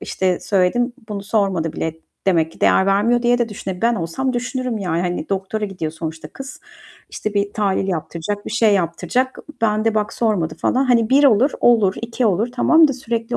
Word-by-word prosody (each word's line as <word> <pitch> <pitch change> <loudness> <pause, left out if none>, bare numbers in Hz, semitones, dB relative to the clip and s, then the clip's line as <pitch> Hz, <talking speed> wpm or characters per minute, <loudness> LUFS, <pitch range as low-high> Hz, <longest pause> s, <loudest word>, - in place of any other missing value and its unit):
"İşte, 185 -2 -1
söyledim, 210 +6 +1 0.2
bunu 205 -2 -5
sormadı 195 -6 0
bile. 160 0 -3 0.3
Demek 165 -3 +2
ki - - -19
değer 190 - +4
vermiyor." 215 +5 +2
diye 245 0 +3
de 240 -1 0
düşüne 190 -2 -6
ben 235 +1 +3
olsam 230 +8 -2
düşünürüm 250 -1 -3
yani, 175 -4 -1
hani, 180 -1 -3
doktora 195 +2 -2
gidiyor 180 -6 -4
sonuçta 160 -1 -6
kız. 270 - -10 0.5
İşte, 215 -1 -4
bir 200 0 0
tahlil 195 -2 0
yaptıracak, 180 +3 -4
bir - - -5
şey 225 -2 +3
yaptıracak. 185 +9 -1 0.2
Ben 215 -1 +1
de 225 - +1
bak 210 -1 -1
sormadı 210 -9 0
falan. 265 +2 +1
Hani, 235 -3 +2
1 285 +2 +5
olur; 260 +2 +5
olur, 220 -6 +4
2 235 +1 -1
olur, 210 +4 +1
tamam 320 +5 +5
da 275 - 0
sürekli 235 -2 -3
210 Hz, 190 wpm, -20 LUFS, 185-240 Hz, 0.5 s, 1